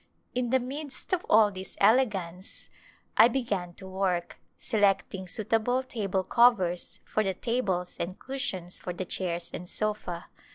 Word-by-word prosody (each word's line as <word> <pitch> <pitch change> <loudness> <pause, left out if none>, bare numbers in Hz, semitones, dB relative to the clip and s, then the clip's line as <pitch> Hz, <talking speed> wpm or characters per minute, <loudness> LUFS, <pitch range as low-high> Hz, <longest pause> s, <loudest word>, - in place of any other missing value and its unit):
In 245 -1 0
the 260 +2 +4
midst 275 +6 -6
of 360 - +1
all 215 -1 +6
this 190 -1 -8
elegance 195 -7 +1 0.5
I - - +9
began 205 -9 -2
to 190 - -9
work, 185 -2 -1 0.2
selecting 195 -3 +1
suitable 225 +6 +1
table 200 -7 -1
covers 190 -5 +3
for 215 - 0
the 190 -2 -1
tables 190 -6 -1
and 185 +2 -3
cushions 190 -10 -4
for 180 - -4
the 185 +2 -4
chairs 175 -2 -2
and 180 +1 -6
sofa. 210 -5 -2
200 Hz, 140 wpm, -29 LUFS, 180-240 Hz, 0.5 s, I